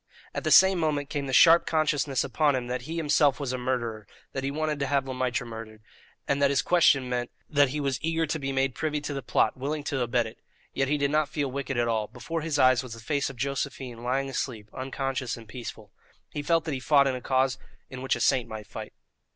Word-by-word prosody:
At - - -3
the - - 0
same 190 -1 +7
moment 145 -3 -1
came 145 -3 -2
the - - -3
sharp 165 +5 +7
consciousness 145 -4 +1
upon 150 -3 +2
him 125 -1 -2
that 125 0 -3
he 165 - -3
himself 145 -3 +3
was 135 -3 -2
a - - -1
murderer, 120 -4 -2 0.3
that 135 - -3
he 135 - 0
wanted 155 +1 -2
to 140 - -1
have 140 -1 +1
Le 130 - -3
Maître 125 0 -1
murdered, 110 -2 -9 0.4
that 140 0 +2
his 140 -1 +2
question 140 -7 +4
meant 125 -1 -2 0.2
that 145 -2 +3
he 150 +3 -3
was 140 -2 -1
eager 165 0 0
to 155 +1 -2
be 135 -1 -3
made 135 -1 +1
privy 150 0 -2
to 145 0 -4
the 135 - -3
plot, 110 -2 +1
willing 145 +3 -3
to 140 -2 -2
abet 120 0 +1
it. 110 - -10 0.3
Yet 135 0 0
he 150 +2 +1
did 140 -1 0
not 155 0 +2
feel 145 -3 -2
wicked 135 -1 -3
at 120 0 +2
all; 110 -2 0
before 165 +8 -5
his 155 -1 -1
eyes 130 -2 +5
was 130 -4 -8
the - - -11
face 140 +5 -1
of 135 - -9
Josephine 135 -2 -3
lying 130 +3 0
asleep, 115 -5 -4
unconscious 130 -1 -3
and 115 -1 -12
peaceful. 110 -3 -8 0.4
He 145 - -3
felt 165 +2 +2
that 155 - -2
he 130 - -2
fought 140 +2 +4
in 135 - +1
a 125 - -5
cause 130 0 +1 0.3
in 130 -1 -8
which 130 - +1
a - - -5
saint 125 -3 +2
might 110 -1 -7
fight. - - -8
135 Hz, 240 wpm, -27 LUFS, 125-145 Hz, 0.4 s, same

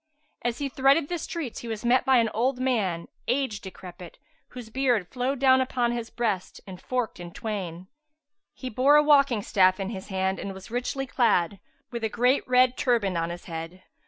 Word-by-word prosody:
As 240 -1 -2
he 285 - -2
threaded 275 +3 +3
the 350 -1 -2
streets 315 -7 -5
he 235 - -8
was 225 0 -5
met 250 +2 +3
by 265 -1 +5
an 225 -2 +2
old 250 +4 +1
man 205 -10 0 0.2
age 245 -5 -1
decrepit, 180 -2 -10 0.3
whose 245 -3 -10
beard 245 -7 +1
flowed 255 +4 -2
down 260 0 +5
upon 250 -2 0
his 235 -1 -4
breast 215 -6 -2
and 185 -2 -10
forked 250 -7 -3
in 175 -1 -8
twain;[FN#380] 185 -5 -5 0.7
he 255 - -6
bore 260 +6 +4
a 300 - +6
walking 280 -7 +4
staff 185 -1 +3
in 195 +2 -3
his 190 -3 -7
hand 190 -1 -1
and 195 -1 -5
was 190 +3 -11
richly 250 +3 -2
clad, 200 -8 +1 0.3
with 235 -2 -5
a 220 - +1
great 250 +5 +2
red 255 0 +4
turband 225 -7 +1
on 165 - -2
his 175 0 -7
head. 165 +2 -7
235 Hz, 190 wpm, -26 LUFS, 190-255 Hz, 0.7 s, a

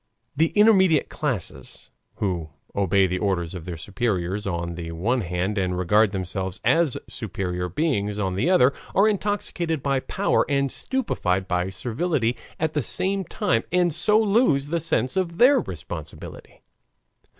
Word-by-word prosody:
The 160 +3 +3
intermediate 190 -7 +5
class, 125 - -5 0.2
who 90 -6 -2 0.3
obey 100 0 +3
the 90 0 -1
orders 95 -5 -1
of 90 -3 -7
their 90 -2 -5
superiors 100 +1 -2
on 85 -2 -3
the 85 -1 -6
one 115 +10 0
hand 90 +3 -2
and 90 -1 -1
regard 105 +4 +3
themselves 95 -1 -4
as 165 -5 +3
superior 90 -3 -4
beings 105 - -1
on 95 -3 -1
the 100 - 0
other, 140 -8 +5 0.2
are 200 +2 +5
intoxicated 190 -7 -1
by 140 -1 +1
power 195 +9 +1
and 140 -1 +1
stupefied 95 - -1
by 90 0 0
servility 120 - -1 0.2
at 160 0 0
the 150 - +1
same 190 - 0
time 115 -6 0
and 175 -2 +2
so 210 +7 +3
lose 205 - +2
the 170 +1 0
sense 155 -5 0
of 175 -3 -1
their 260 +6 +6
responsibility. - - -8
115 Hz, 150 wpm, -24 LUFS, -, 0.3 s, their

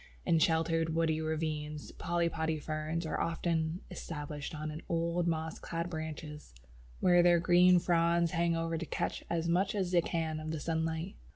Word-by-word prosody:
In 165 -2 +3
sheltered 165 0 +2
woody 160 -1 +1
ravines, 155 -1 -3
Polypody 165 -2 -1
ferns 155 +2 -3
are 160 - -2
often 165 0 -1
established 150 -1 -6
on 155 +1 -5
old 170 +1 0
moss 160 -1 -2
clad 170 +1 -4
branches, 155 - -6 0.5
where 175 -1 +6
their 175 0 +5
green 180 +1 +6
fronds 170 -1 +2
hang 170 -1 +1
over 165 0 -1
to 170 - -4
catch - - -2
as 170 -1 0
much 185 +4 +1
as 190 -3 -1
they 175 -1 +5
can 160 -2 -2
of 155 0 -5
the 160 -1 -3
sunlight. 160 +3 -2
165 Hz, 160 wpm, -32 LUFS, 160-170 Hz, 0.5 s, where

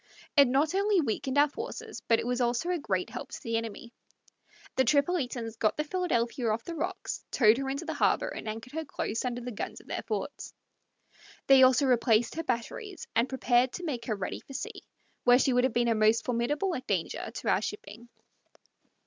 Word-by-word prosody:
It 280 -3 +7
not 285 +6 +2
only 400 0 +3
weakened 265 0 -1
our 290 +1 +6
forces, 450 - -7
but 230 - +5
it - - -3
was 245 +1 -1
also 245 +9 0
a 355 - 0
great 185 -9 -2
help - - -6
to - - -7
the 230 0 -2
enemy. 230 +1 -4 0.8
The 260 - +4
Tripolitans 255 -5 0
got 215 - +1
the 300 - +1
Philadelphia 255 -9 -1
off 220 +2 -1
the 340 - -6
rocks, 335 +3 -4
towed 220 -2 +5
her 270 0 -2
into 280 +5 -3
the 320 - -3
harbor, - - +2
and 220 - -6
anchored 225 +4 -7
her 320 +1 -2
close 235 -5 -3
under 245 -1 -2
the 245 +1 -5
guns 210 - -5
of - - -18
their - - -4
forts. - - -5 0.9
They 270 -1 +7
also 260 +2 +6
replaced 235 -3 +3
her 330 - -3
batteries, 315 - -4
and 235 +3 +2
prepared 255 -1 +2
to 360 - -6
make 245 -7 -3
her 220 - -1
ready 195 -2 -4
for 275 - -13
sea, - - -5 0.4
where 245 0 +7
she 260 0 +2
would 250 +1 +4
have 260 - +1
been 240 0 +2
a 230 - +3
most 220 +1 +3
formidable 295 +10 0
danger 185 -5 -2
to - - -4
our - - +3
shipping. 240 - -7
250 Hz, 200 wpm, -29 LUFS, 230-295 Hz, 0.9 s, It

